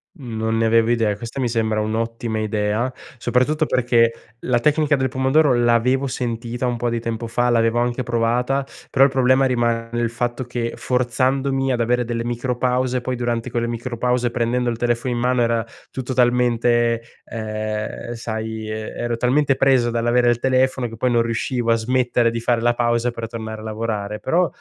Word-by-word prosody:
Mhmm, 120 -8 -7
non 110 0 0
ne 115 - +2
avevo 115 0 +3
idea, 115 -3 +1
questa 115 +5 -7
mi 125 -3 0
sembra 110 -2 0
un'ottima 115 +1 -2
idea, 110 +3 -1 0.3
soprattutto 135 +6 +1
perché 115 -3 +1
la 120 -1 +1
tecnica 150 +2 +2
del 130 -2 0
pomodoro 135 +2 +3
l'avevo 120 +3 +2
sentita 120 -1 -3
un 120 -1 -1
po' 120 +1 -1
di 115 0 -1
tempo 115 0 -4
fa, 120 +2 +1
l'avevo 115 0 +2
anche 120 +1 0
provata, 120 +3 0 0.3
però 135 0 +6
il 140 - +3
problema 130 0 +3
rimane 120 -2 0
il 115 -1 0
fatto 120 +1 -2
che 120 -1 -3
forzandomi 130 +2 0
ad 120 - 0
avere 120 +1 +1
delle 115 0 -2
micro 120 +1 -2
pause, 125 0 0
poi 130 +1 -2
durante 120 0 -2
quelle 120 -1 -1
micro 120 +1 -4
pause, 125 0 +1
prendendo 120 +1 0
il 115 - -3
telefono 120 +1 0
in - - -2
mano, 125 0 +1
era 115 -1 +1 0.2
tutto 130 0 -4
talmente, 120 -1 +2 0.2
ehm, 110 +1 -4
sai, 110 -1 -5
ehm, 110 0 -4
ero 120 -1 -2
talmente 135 +3 +2
preso 130 -3 +3
dall'avere 120 +1 +2
il 120 - +2
telefono 130 -1 +1
che 115 - -9
poi 125 +3 0
non 120 -1 +3
riuscivo 115 +1 -1
a - - +5
smettere 120 0 +1
di 115 0 -3
fare 115 0 +1
la 120 0 +2
pausa 120 0 +1
per 115 -1 -5
tornare 110 -1 -6
a - - -10
lavorare. 105 -1 -3
Però 175 +5 +2
120 Hz, 185 wpm, -21 LUFS, 115-125 Hz, 0.3 s, però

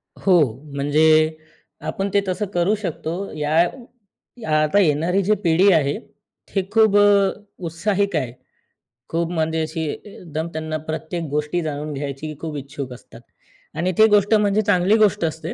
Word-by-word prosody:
हो, 190 -2 +2 0.4
म्हणजे 155 +2 +3 0.5
आपण 195 +1 -2
ते 200 - +4
तसं 185 +3 -1
करू 175 +4 +2
शकतो. 185 -1 -5
या 150 0 -1 1.1
आता 155 +7 +2
येणारी 170 +2 +2
जी 210 +3 +3
पिढी 175 +4 +4
आहे 145 -1 +1 0.5
ती 195 - 0
खूप 220 -2 +4
अ, 205 -1 +5 0.3
उत्साहिक 195 +3 -1
आहे. 130 -6 -1 0.8
खूप 165 0 -1
म्हणजे 160 -1 0
अशी 160 +1 -4
एकदम 165 -5 -7
त्यांना 155 0 -3
प्रत्येक 160 +2 -4
गोष्टी 150 +4 -1
जाणून 150 0 -4
घ्यायची 140 +2 -5
खूप 155 -2 -4
इच्छुक 140 -1 -7
असतात 115 -1 -14 0.6
आणि 180 +3 0
ती 220 - +7
गोष्ट 205 0 +3
म्हणजे 210 -1 +3
चांगली 200 0 +3
गोष्ट 205 -3 +3
असते, 160 0 -4
165 Hz, 145 wpm, -21 LUFS, 155-200 Hz, 1.1 s, ती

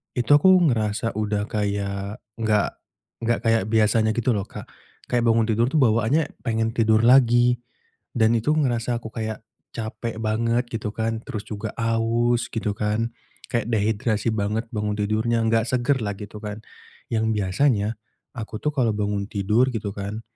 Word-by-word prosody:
itu 125 +2 0
aku 165 +6 +6 0.2
ngerasa 110 0 -1
udah 105 -1 -1
kayak 100 0 -3 0.2
gak 105 -2 +1 0.5
gak 120 0 +1
kayak 115 -2 +3
biasanya 110 0 +3
gitu 120 +1 +1
loh 100 - -1
Kak. - - -9 0.4
Kayak 120 -1 +1
bangun 115 -1 +3
tidur 115 +3 +1
tuh 155 - +2
bawaannya 125 +5 +2
pengen 115 -1 -1
tidur 110 -2 +3
lagi, 120 -1 +5 0.6
dan 110 0 +4
itu 115 +6 -2
ngerasa 120 -5 0
aku 115 - -8
kayak 110 -1 -4 0.3
capek 115 0 -5
banget 115 +3 +1
gitu 110 -1 -2
kan, 115 0 -2
terus 105 -2 -5
juga 105 +1 -4
aus 115 +1 +1
gitu 110 -3 -2
kan, 110 +2 -1 0.4
kayak 115 -3 0
dehidrasi 110 0 0
banget 110 +2 -1
bangun 105 -1 -2
tidurnya, 110 +3 0
nggak 115 0 +2
segar 130 +1 +1
lah 100 -1 -2
gitu 105 +1 -9
kan. 105 -1 -5 0.6
Yang 110 -1 +1
biasanya, 105 +2 +1 0.5
aku 110 -2 -5
tuh 150 - 0
kalau 125 -5 +2
bangun 105 -1 -1
tidur 105 +6 +2
gitu 105 -3 -3
kan 100 +2 -5
110 Hz, 155 wpm, -23 LUFS, 105-120 Hz, 0.6 s, aku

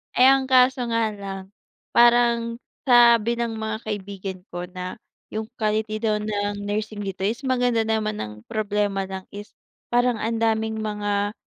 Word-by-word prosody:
eh, 255 - +7
ang 270 0 +4
kaso 255 -1 +4
nga 230 -1 +2
lang, 195 -1 -7 0.5
parang 235 -1 +4 0.3
sabi 235 -2 +6
ng 230 -1 -2
mga 220 0 -3
kaibigan 195 -2 -5
ko 175 0 -4
na 180 0 -6 0.4
yung 220 0 -3
quality 215 0 0
daw 215 -1 +1
ng 205 -1 -2
nursing 210 +1 -3
dito 195 -1 -3
is 230 +5 -2
maganda 245 -3 +2
naman 215 -1 -1
ang 105 0 -5
problema 205 -2 -1
lang 190 -1 -6
is 205 +1 -8 0.4
parang 245 0 +3
ang 225 +1 -1
daming 220 -1 0
mga 205 -1 -1
215 Hz, 150 wpm, -24 LUFS, 205-235 Hz, 0.5 s, eh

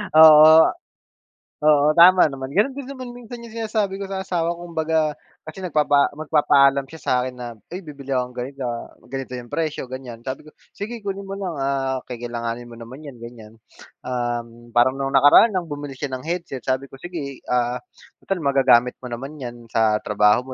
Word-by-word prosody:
oo. 155 0 +9 1.0
Oo, 150 -1 +5
tama 180 -1 +7
naman 135 0 -7
ganon 260 +8 +1
din 280 - -6
naman 260 -2 -8
minsan 240 0 -10
yung 235 - -10
sinasabi 215 -3 -1
ko 200 - -5
sa 190 0 -4
asawa 170 -2 -1
ko. 175 - -12
Kumbaga 160 -3 0 0.2
kasi 155 +4 -11
nagpapa 145 -4 +2
magpapaalam 140 -3 +3
siya 160 +2 -13
sa'kin 125 0 0
na, 120 -2 -8 0.2
"Ay 185 - -5
bibili 140 -4 -7
ako 125 -1 0
ganito, 130 +2 -7 0.5
ganito 135 -1 -5
yung 120 -1 -7
presyo, 155 -5 -3
ganyan." 125 -3 -8
Sabi 130 +3 -6
ko, 155 - -14 0.2
"Sige 220 +3 -7
kunin 200 0 -5
mo 195 - -6
lang, 185 -6 -4
ah, 135 -1 -1
kakailanganin 120 -1 -5
mo 115 - -12
naman 120 +5 -11
yan 125 - -13
ganyan." 115 -2 -11 0.5
Um, 120 -1 -4
parang 130 +3 +2
nung 135 - -1
nakaraan 145 - +7
ng 185 -4 -2
bumili 145 -3 -7
siya 140 -2 -4
ng 130 - -4
headset 170 -8 -4
sabi 130 +2 -1
ko, 135 - -21
"Sige, 155 -7 -6
ah, 125 0 0 0.4
total 195 - -2
magagamit 130 -3 +4
mo 125 - -7
naman 135 +5 -7
yan 120 -1 -8
sa 110 -1 +3
trabaho 105 +5 +2
140 Hz, 180 wpm, -22 LUFS, 125-165 Hz, 1.0 s, oo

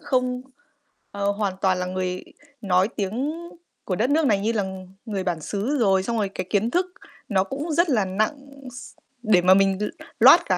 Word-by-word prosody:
không, 255 -3 -1 0.7
ờ, 200 0 0
hoàn 200 -2 -1
toàn 190 -1 +2
là 180 - -2
người 185 0 -3 0.4
nói 185 -2 +3
tiếng 225 +8 -2 0.5
của 185 - -1
đất 230 +7 +1
nước 310 +2 +3
này 205 -4 +3
như 215 +3 0
là 215 -3 0 0.4
người 200 -5 -3
bản 175 -3 -2
xứ 215 - -2
rồi, 195 -4 +3
xong 230 +2 -2
rồi 205 -2 0
cái 185 -1 -5
kiến 210 +2 +1
thức 360 +5 +2 0.4
nó 190 -3 +2
cũng 280 - -5
rất 340 +3 +2
là 220 -8 +2
nặng 210 +8 0 0.3
s 245 - -10 0.3
để 210 -6 +4
mà 185 +1 +6
mình 195 0 +3
l - - +1 0.3
load - - +9
cả - - +1
205 Hz, 200 wpm, -24 LUFS, 190-245 Hz, 0.7 s, load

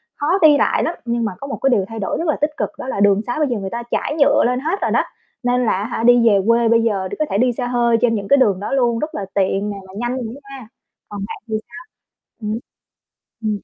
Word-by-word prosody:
khó 290 - -3
đi 300 -2 +7
lại - - +2
lắm, 335 - -1
nhưng 235 0 -1
mà 215 - -1
có 275 - -6
một 275 - -5
cái 270 - +3
điều 205 -7 +2
thay 225 -1 -7
đổi 195 - -2
rất 335 - -2
là 305 - +2
tích 295 - +2
cực - - -1
đó - - -6
là 230 - -3
đường 200 0 +4
sá 245 - -2
bây 300 - +2
giờ 240 -4 -2
người 195 -1 -4
ta 235 +3 -5
trải 295 - -1
nhựa 280 - +4
lên 250 +1 +1
hết 325 +8 -2
rồi - - 0
đó, - - +3 0.4
nên 245 0 +1
là - - +2
á 200 +3 -1
hả, 230 -1 -3
đi 240 -1 +5
về 200 -2 +5
quê 230 0 +4
bây 230 0 +4
giờ 195 -4 0
có 305 - +2
thể 195 - 0
đi 250 +3 +3
xe 250 - -3
hơi 240 -1 +2
trên 230 -2 +3
những 200 -2 -4
cái 280 - +5
đường 205 -8 +3
đó 205 - -5
luôn, 240 -4 +2
rất 305 - -4
là 200 - -3
tiện 195 +1 0
nè 200 - -5
mà 190 - -14
nhanh 240 +2 -2
nữa 245 +2 -6 0.2
nha. 245 -5 -11 0.4
Còn 205 - -7
bạn - - -7
thì 220 - -2
sao? 240 +8 -10 0.6
Ừm. 215 +1 -2 0.8
Ừm, 215 -1 0
235 Hz, 280 wpm, -19 LUFS, 210-255 Hz, 0.8 s, đi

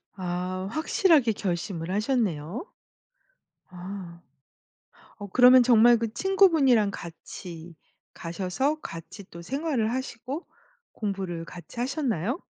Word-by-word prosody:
아. 185 0 -3
확실하게 315 - +3
결심을 175 -3 -3
하셨네요. 210 - -1 1.0
아. 180 -1 -8 1.0
어 205 - -6
그러면 250 +4 +7
정말 240 0 +6
그 225 -1 -3
친구분이랑 300 - +4
같이 170 -1 -9 0.4
가셔서 190 - -2
같이 165 +5 -9
또 170 - -9
생활을 265 - -1
하시고 260 +4 -5 0.5
공부를 190 -5 -4
같이 175 +7 -10
하셨나요? 250 - -1
210 Hz, 230 characters per minute, -26 LUFS, 175-260 Hz, 1.0 s, 그러면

